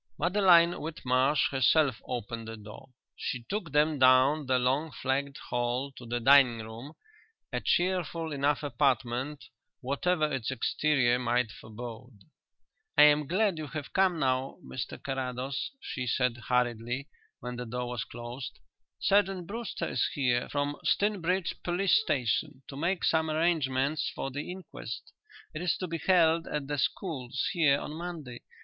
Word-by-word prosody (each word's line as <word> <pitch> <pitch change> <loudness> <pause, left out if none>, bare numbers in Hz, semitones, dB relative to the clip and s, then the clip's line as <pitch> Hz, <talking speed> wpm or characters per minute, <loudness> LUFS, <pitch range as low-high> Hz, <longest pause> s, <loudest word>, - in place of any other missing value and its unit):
Madeline 175 -1 +5
Whitmarsh 135 -2 +1
herself 135 -1 +3
opened 115 -1 -4
the 115 0 -7
door. 105 +5 -12 0.3
She 125 -2 -4
took 195 -6 -3
them 150 0 +2
down 130 +3 +5
the 130 -1 +3
long 135 +6 +1
flagged 135 +3 -2
hall 125 +3 -1
to 125 -3 -12
the 120 +1 -1
dining 130 -1 +6
room, 115 +7 -9 0.6
a - - 0
cheerful 175 -3 0
enough 145 +1 0
apartment 135 +1 0 0.4
whatever 155 +5 +1
its 135 -7 -2
exterior 130 0 +1
might 120 -2 +1
forebode. 115 +2 -9 0.8
"I 150 - +9
am 150 -1 +5
glad 190 0 +1
you 155 - -5
have 145 0 -7
come 190 -3 +3
now, 130 -2 0
Mr 125 - -5
Carrados," 135 -1 -3
she 125 - -5
said 125 +1 +1
hurriedly, 120 +2 0 0.3
when 125 0 -6
the 125 -1 -5
door 125 +2 -3
was 120 -4 -3
closed. 120 +2 -8 0.4
"Sergeant 195 -2 +2
Brewster 230 +5 -4
is - - 0
here 125 -4 +1
from 145 0 -1
Stinbridge 190 -3 0
police 180 +2 +2
station 130 - -1
to 135 - -8
make 170 +5 -1
some 160 -1 +2
arrangements 155 -3 +1
for 135 - -4
the 145 +5 -5
inquest. 185 +1 -8 0.4
It 155 - -5
is 180 -2 +1
to 185 - -3
be 165 -1 -4
held 165 -2 +3
at 150 -2 -3
the 145 0 -3
schools 130 - -2
here 150 -6 +3
on 150 - -6
Monday. 160 -7 -7
140 Hz, 145 wpm, -29 LUFS, 125-160 Hz, 0.8 s, I